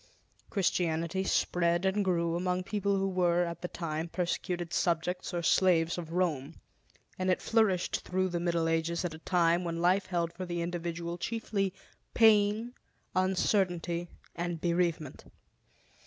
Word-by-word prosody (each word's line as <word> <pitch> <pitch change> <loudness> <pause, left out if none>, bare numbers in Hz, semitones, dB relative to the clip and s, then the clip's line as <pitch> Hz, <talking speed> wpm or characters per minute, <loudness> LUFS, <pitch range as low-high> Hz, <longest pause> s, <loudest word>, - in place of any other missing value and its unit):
Christianity 175 -2 0
spread 175 -1 +1
and 195 +2 +2
grew 170 -3 +1
among 180 +1 -1
people 200 0 0
who 195 0 0
were, 175 -2 +2
at 170 -1 -5
the 180 - -3
time, 160 -2 -4
persecuted 175 -1 -2
subjects 180 +2 0
or 175 -1 -2
slaves 170 -2 +3
of 165 -2 -6
Rome; 160 -5 -1 0.6
and 185 0 0
it 185 - +2
flourished 215 -6 +2
through 185 +1 -1
the 175 -1 -2
Middle 170 -1 0
Ages 165 +2 0
at 170 - -3
a 160 - -9
time 170 0 +2
when 170 -1 -3
life 185 +3 +2
held 170 -2 -1
for 185 +1 -6
the 175 -1 -2
individual 170 0 -4
chiefly 205 -1 -1 0.4
pain, 220 +1 +4 0.4
uncertainty, 180 -2 +1 0.3
and 175 -1 -3
bereavement. 170 -4 -1
175 Hz, 140 wpm, -30 LUFS, 170-185 Hz, 0.6 s, pain